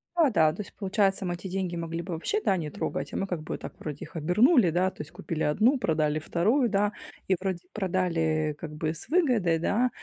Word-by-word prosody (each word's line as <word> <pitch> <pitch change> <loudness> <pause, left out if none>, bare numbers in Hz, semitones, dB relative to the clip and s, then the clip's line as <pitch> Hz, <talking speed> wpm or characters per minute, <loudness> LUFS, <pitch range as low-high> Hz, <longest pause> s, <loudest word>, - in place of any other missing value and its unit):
Да-да, 215 - +4
то 195 - -5
есть, 195 - -11
получается, 195 -1 +1
мы 175 - -1
эти 175 +2 -6
деньги 185 -1 -2
могли 165 0 -3
бы 170 - -5
вообще, 170 - -1
да, 190 - +4
не 160 -4 -3
трогать, 140 -1 -4
а - - -2
мы - - 0
как 180 -5 -3
бы 155 - -5
так - - -8
вроде 150 -3 -5
их 160 - -17
обернули, 210 - +4
да? 180 +3 +1
То - - -8
есть, 145 - -8
купили 155 0 -5
1, 225 - +3
продали 155 -5 +1
2, 220 - +2
да? 205 0 +2 0.4
И 190 - +3
вроде 190 -2 -2
продали 165 -6 0
как 165 - -6
бы, 155 +1 -1
с 165 - -11
выгодой, 245 - +3
да? 235 +9 +2
180 Hz, 220 wpm, -27 LUFS, 160-205 Hz, 0.4 s, Да-да